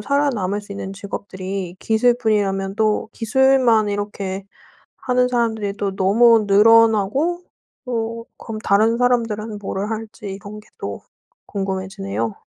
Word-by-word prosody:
살아남을 240 -9 0
수 205 - -10
있는 195 -1 -6
직업들이 190 -2 -6
기술뿐이라면 215 -4 +1
또 215 0 +1
기술만 240 -2 +3
이렇게 200 -1 -4 0.5
하는 250 0 +1
사람들이 220 -4 -1
또 195 -1 -2
너무 220 +3 +5
늘어나고 225 - +4 0.4
또 230 -1 -3
그럼 220 -2 -7
다른 220 +4 +3
사람들은 225 -4 0
뭐를 205 +1 -4
할지 220 -1 -6
이런 205 +2 -9
게 - - -22
또 - - -5 0.5
궁금해지네요. 190 - -3
210 Hz, 290 characters per minute, -20 LUFS, 195-230 Hz, 0.5 s, 너무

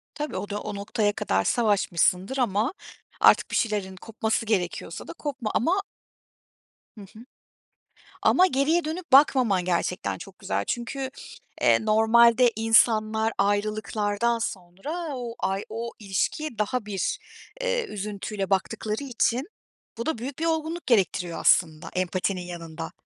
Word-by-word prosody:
Tabii, 300 0 -4
o 205 - -5
da, 205 0 -3
o 210 - -5
noktaya 205 +1 0
kadar 95 - 0
savaşmışsındır 200 0 +1
ama, 230 - +1 0.5
artık - - +5
bir - - -1
şeylerin 205 -4 -1
kopması 220 +2 -2
gerekiyorsa 180 -5 -2
da - - -7
kopma, 280 -9 -4
ama 370 +10 +1 1.1
Hı 210 - -9
hı. 215 +4 -13 1.0
Ama 370 +1 +5
geriye 310 +3 +1
dönüp 320 -2 -5
bakmaman, 255 -9 +5
gerçekten 180 +2 -1
çok - - -12
güzel. - - -2
Çünkü, 260 +2 -3 0.5
eee, - - +4
normalde 235 +3 +5
insanlar 220 0 +3
ayrılıklardan 210 +2 0
sonra 230 - -5
o 240 -2 -5
ay, 195 +1 -1
o 230 +2 -5
ilişkiye 215 +7 -2
daha 215 +2 -1
bir, 200 -3 -2 0.4
eee, - - 0
üzüntüyle 205 - -4
baktıkları 215 +5 -1
için, 255 - 0 0.5
bu 235 - -4
da 320 -8 -1
büyük 255 +3 -6
bir 330 - -1
olgunluk 320 +1 -2
gerektiriyor 185 -6 +1
aslında, 160 -2 +2
empatinin 185 +1 -1
yanında. 165 -2 -7
220 Hz, 130 wpm, -26 LUFS, 195-255 Hz, 1.1 s, artık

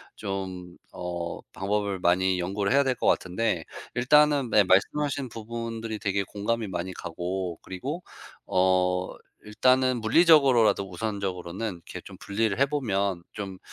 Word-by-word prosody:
좀 95 -2 -5 0.2
어 85 -1 -4
방법을 100 0 -2
많이 90 +1 +2
연구를 100 +4 -1
해야 140 0 +5
될 130 -2 0
것 - - -4
같은데 95 -2 +1 0.3
일단은 145 0 +4
네. 105 -1 +5
말씀하신 135 +8 +1
부분들이 115 -1 -5
되게 100 -1 0
공감이 105 +3 -2
많이 95 -1 -4
가고 90 +1 -4
그리고 135 - -5 0.5
어 90 0 +2 0.3
일단은 130 +3 +2
물리적으로라도 125 - +5
우선적으로는 95 0 -3
이렇게 85 - -10
좀 - - -12
분리를 105 0 -1
해보면 100 -10 0
좀 95 -3 -6
100 Hz, 300 characters per minute, -27 LUFS, 95-115 Hz, 0.5 s, 해야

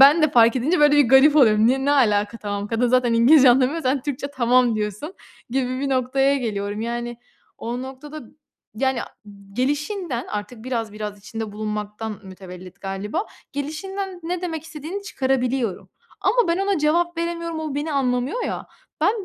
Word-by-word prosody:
ben 290 +4 +8
de 310 - +4
fark 235 0 +5
edince, 300 +7 +1
böyle, 295 0 +6
bir 285 -5 +5
garip 270 +4 +6
oluyorum. 220 -5 +5
Ne 265 +2 +2
ne 285 - +3
alaka 210 -4 +2
tamam 205 -1 -4
kadın 235 +2 +1
zaten 250 -1 +3
İngilizce 255 +3 +7
anlamıyor, 265 +6 +2
sen 260 0 0
Türkçe 280 0 -3
tamam 245 -1 +3
diyorsun 210 - -4 0.4
gibi 255 0 -1
bir 280 - -1
noktaya 270 +1 +2
geliyorum, 205 -4 -3
yani, 240 +1 -3 0.4
o 240 +2 -4
noktada, 275 +4 -8 0.6
yani, 265 -1 +1 0.5
gelişinden 290 - -2
artık 210 +2 -6
biraz 230 -4 -3
biraz 210 -1 -6
içinde 220 +1 -6
bulunmaktan 210 0 -5
mütevellit 185 0 -11
galiba 205 - -3 0.3
gelişinden 365 +6 -5
ne 350 +1 -3
demek 325 -4 -4
istediğini 325 +5 -7
çıkarabiliyorum 260 - -1 0.3
ama 480 -6 +2
ben 335 - +1
ona 390 -2 +1
cevap 335 +3 +1
veremiyorum, 335 -1 -3
o 305 -3 -4
beni 300 +2 -2
anlamıyor 260 - 0
ya, - - -4 0.3
ben, 415 -2 +1
260 Hz, 160 wpm, -22 LUFS, 225-305 Hz, 0.6 s, ben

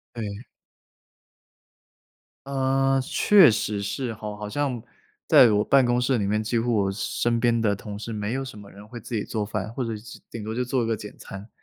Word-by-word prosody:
对。 105 0 -5 2.0
呃， 135 0 +1
是 - - -10
确 195 -9 +6
实 105 -2 -2
是 120 +4 -3
吼， 105 -1 -7
好 105 0 -6
像 130 -2 -2 0.5
在 120 - +7
我 105 0 +2
办 135 0 +4
公 120 0 +2
室 125 0 +1
里 100 - -1
面 105 +2 0
几 115 +2 -1
乎 120 0 0
我 95 - 0
身 115 +3 -1
边 115 -1 +2
的 105 -2 +1
同 100 +1 -8
事 115 +1 -6
没 105 0 -3
有 135 +1 -2
什 130 -5 -9
么 100 -1 -12
人 100 +2 -13
会 120 +2 -9
自 115 - -8
己 105 - 0
做 110 -2 -3
饭， 105 0 -4
或 125 0 -3
者 115 -2 -3
是 110 +2 -11
顶 115 - -7
多 110 +1 -4
就 125 +2 -1
做 125 0 0
一 115 - -1
个 115 -1 0
简 105 0 -10
餐。 100 +3 -10
115 Hz, 230 characters per minute, -25 LUFS, 105-125 Hz, 2.0 s, 在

